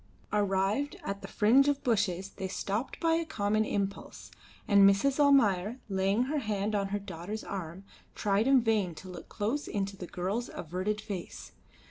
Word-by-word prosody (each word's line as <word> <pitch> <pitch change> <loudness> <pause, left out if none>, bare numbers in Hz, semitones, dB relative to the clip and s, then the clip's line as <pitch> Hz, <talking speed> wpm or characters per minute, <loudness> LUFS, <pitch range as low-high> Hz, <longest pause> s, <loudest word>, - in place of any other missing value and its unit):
Arrived 205 +6 +1
at 200 0 -4
the - - -7
fringe 250 +7 +4
of 285 -1 0
bushes 200 -5 0
they 190 - -5
stopped 200 +5 -3
by 330 -1 +2
a 330 +1 +1
common 215 -7 0
impulse, 200 -2 -4 0.4
and 200 -1 +5
Mrs. 265 +9 +1
Almayer, 235 -6 +4
laying 195 +4 +1
her 295 +4 -1
hand 210 -3 -2
on 200 -1 0
her 200 +1 -2
daughter's 200 +2 -6
arm, 185 -1 -6 0.3
tried 205 +3 +1
in 270 -2 +6
vain 210 -7 +1
to 185 - -11
look 180 -2 -10
close 235 +9 -2
into 200 -1 -2
the 180 -2 -8
girl's 195 +9 -3
averted 185 +6 -3
face. 195 -6 -7
205 Hz, 165 wpm, -30 LUFS, 195-230 Hz, 0.4 s, in